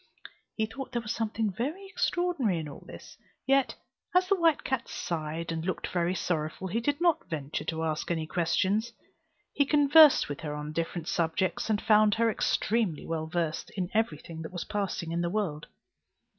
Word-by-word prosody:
He 220 - +1
thought 260 +4 -8
there 240 - 0
was 215 - -2
something 220 -1 -1
very 300 - -3
extraordinary 350 - 0
in 160 -2 -4
all 145 - -10
this: - - -12 0.3
yet, 275 -1 +3 0.4
as 365 0 +5
the 395 - +4
white 330 -4 +3
cat 265 -2 -2
sighed 165 0 -3
and 160 -1 -3
looked 185 +2 -2
very 175 +1 0
sorrowful, 160 0 -2
he 220 +6 0
did 285 +5 0
not 340 - +2
venture 150 -3 -4
to 160 0 -2
ask 155 -1 -2
any 165 -2 -1
questions. 185 +8 0 0.6
He 285 - +3
conversed 295 +1 +6
with 145 - -5
her 150 -2 -4
on 150 0 -5
different 165 0 -3
subjects, 175 +5 0
and 210 -2 +2
found 215 -1 +4
her 230 0 +3
extremely 215 -4 0
well 160 -1 -3
versed 165 -1 -2
in 180 -1 -2
every 220 -8 +1
thing 160 +1 -9
that 160 - -7
was 175 -2 -4
passing 195 -5 -3
in 170 +1 -1
the 170 - 0
world. 175 -7 -2
190 Hz, 185 wpm, -29 LUFS, 165-235 Hz, 0.6 s, conversed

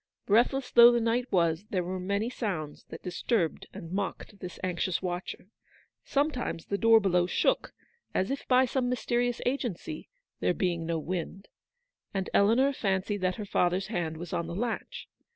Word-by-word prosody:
Breathless 250 +5 +2
though 240 0 +9
the 240 - +2
night 235 +2 0
was, 170 0 +2
there 185 -3 0
were 185 +2 -4
many 200 +4 -1
sounds 185 - -4
that 160 - -9
disturbed 180 -1 -1
and 165 - -9
mocked 200 +1 -4
this 180 -1 -7
anxious 180 0 0
watcher. 180 +1 -4 0.5
Sometimes 275 - -1
the 200 - -2
door 225 -1 +7
below 180 -3 +2
shook - - +1 0.2
— 470 - -43
as 190 +6 +1
if 275 - -4
by 255 0 +5
some 250 0 -1
mysterious 245 -1 0
agency, 260 - -3 0.3
there 180 - +1
being 170 -3 -1
no 165 -1 0
wind 180 +4 -5 0.3
— - - -53
and 190 -1 -2
Eleanor 240 +7 +4
fancied 195 -3 -1
that 185 0 +1
her 210 - -5
father's 185 0 +1
hand 165 -6 -2
was 170 0 -7
on 170 - -1
the 170 - -5
latch. 230 +3 -4
195 Hz, 170 wpm, -29 LUFS, 180-240 Hz, 0.5 s, though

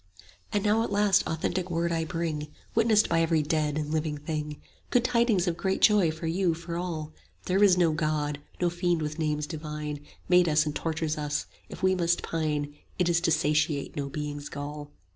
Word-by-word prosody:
And 205 -1 0
now 215 +1 +3
at 230 - -2
last 205 -1 +4
authentic 175 +3 -2
word 170 0 0
I 165 -1 0
bring, 160 -2 -3 0.3
Witnessed 220 -1 +4
by 165 0 +2
every 165 -2 +2
dead 150 -1 0
and 150 -1 -2
living 155 -1 -1
thing; 150 0 -4 0.3
Good 245 - +3
tidings 235 -6 +2
of 170 - +1
great 190 +2 0
joy 205 -6 +5
for 160 +1 -5
you, 170 +1 +1
for 170 +1 -6
all: 160 -3 -4 0.3
There 190 +2 +3
is 185 -3 +6
no 170 -3 +4
God; 150 -1 -1 0.2
no 175 -1 +1
Fiend 175 -2 0
with 155 +1 -4
names 150 -1 0
divine 150 -1 -5
40 145 - -19 0.2
Made 180 -1 +5
us 150 0 +3
and 150 -1 -3
tortures 155 -1 -2
us; 150 -1 -2 0.2
if - - -10
we 190 0 +4
must 175 -2 +1
pine, 150 -3 -2 0.2
It 180 -1 +2
is 170 0 +2
to 175 - +2
satiate 150 -2 +1
no 140 -1 -3
Being's 145 0 -5
gall. 145 +1 -6
160 Hz, 200 wpm, -28 LUFS, 150-180 Hz, 0.3 s, is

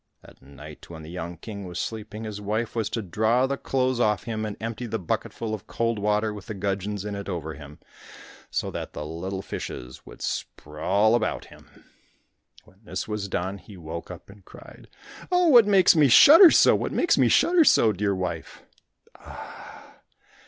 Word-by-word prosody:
At - - -18
night 70 +2 -13
when 80 -2 -10
the 80 - -10
young 85 -1 -6
king 100 +3 -8
was 90 -1 -8
sleeping, 110 +1 -5
his 105 -2 -6
wife 110 +4 -3
was 110 -3 -1
to 115 - -3
draw 110 +7 +1
the 140 +1 -2
clothes 130 -2 -1
off 105 -4 +1
him 110 -2 -4
and 105 -1 -6
empty 115 +2 -5
the 110 - -3
bucketful 110 +4 -4
of 105 - -7
cold 115 -2 -2
water 105 +1 0
with 105 -2 -10
the 110 - -6
gudgeons 100 +1 -3
in 105 - -4
it 100 0 -6
over 80 -4 -4
him, 75 0 -12 0.7
so - - -3
that - - -6
the 75 - -6
little 95 +5 -5
fishes 60 +1 -7
would - - -12
sprawl 95 +9 -1
about 120 -2 -1
him. - - -20 0.8
When 95 - -24
this - - -5
was 105 -2 -4
done, 95 +1 -3
he 100 -1 -14
woke 85 0 -8
up 90 -2 -10
and 100 0 -16
cried - - -15 0.4
"Oh, 360 -1 +3
what 240 -7 +7
makes 195 -4 +5
me 150 -3 +5
shudder 320 - +9
so?—what - - +3
makes 350 - +1
me - - +5
shudder 345 -1 +4
so, 115 - +4
dear 100 +1 -1
wife? 90 -3 -5
105 Hz, 180 wpm, -25 LUFS, 90-115 Hz, 0.8 s, shudder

